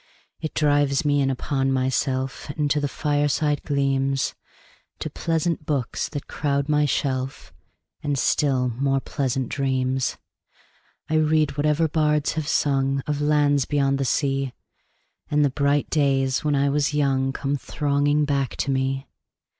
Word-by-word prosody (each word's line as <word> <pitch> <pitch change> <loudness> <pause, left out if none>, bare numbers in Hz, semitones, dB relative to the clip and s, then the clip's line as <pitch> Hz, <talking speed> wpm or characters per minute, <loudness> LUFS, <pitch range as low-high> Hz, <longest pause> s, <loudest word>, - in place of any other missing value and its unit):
It 155 - -5
drives 145 -2 +2
me 145 -1 +3
in 135 - +2
upon 135 0 -1
myself 130 0 -1
5 145 - -7
And 145 -2 0
to 150 - +2
the 145 - 0
fireside 145 +1 0
gleams, 135 -1 0 0.6
To - - -5
pleasant 165 -1 -1
books 140 -6 -1
that 145 - -5
crowd 140 -1 -1
my 150 -1 +3
shelf, 135 -2 -2 0.5
And 145 -2 -1
still 130 -2 +2
more 135 +3 0
pleasant 135 -2 -2
dreams. 130 -1 -1 0.9
I 155 - +1
read 155 -2 +2
whatever 150 +2 +2
bards 150 -1 +1
have 155 -2 -3
sung 135 -2 +1
Of 150 -1 -2
lands 145 -2 +3
beyond 140 -1 +1
the - - +1
sea, 135 0 0 0.8
10 150 - 0
And 150 - +5
the 140 - +1
bright 140 +1 +1
days 135 -3 +1
when 150 -1 +1
I 140 0 +2
was 145 +1 +1
young 135 -2 +1
Come 140 +1 -2
thronging 145 +1 0
back 140 -3 -1
to 140 - -1
me. 135 0 -1
140 Hz, 150 wpm, -24 LUFS, 135-150 Hz, 0.9 s, And